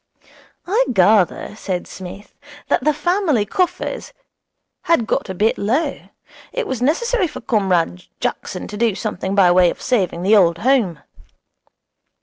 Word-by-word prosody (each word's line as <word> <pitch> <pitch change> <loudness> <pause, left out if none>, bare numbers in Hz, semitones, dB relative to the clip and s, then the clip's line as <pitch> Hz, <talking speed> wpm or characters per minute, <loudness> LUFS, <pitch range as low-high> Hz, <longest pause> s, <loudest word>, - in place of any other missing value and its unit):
'I 440 +7 +2
gather,' 200 0 +2
said 185 -4 -4
Psmith, 190 +2 -10 0.4
'that - - +1
the 305 - +4
family 305 - +1
coffers 365 - -2 0.7
had 330 -9 +2
got - - -2
a 190 - -4
bit 215 +5 +1
low. 245 +11 -1 0.4
It - - -2
was 260 -3 -4
necessary 385 - +1
for - - -8
Comrade 180 - 0
Jackson - - -4
to 210 - -7
do 225 -3 +1
something 190 +1 -3
by 185 -3 +5
way 180 -1 +5
of - - -6
saving 190 -8 -1
the 205 +4 +5
Old 170 -5 +4
Home.' 215 - +1
215 Hz, 140 wpm, -19 LUFS, 185-305 Hz, 0.7 s, by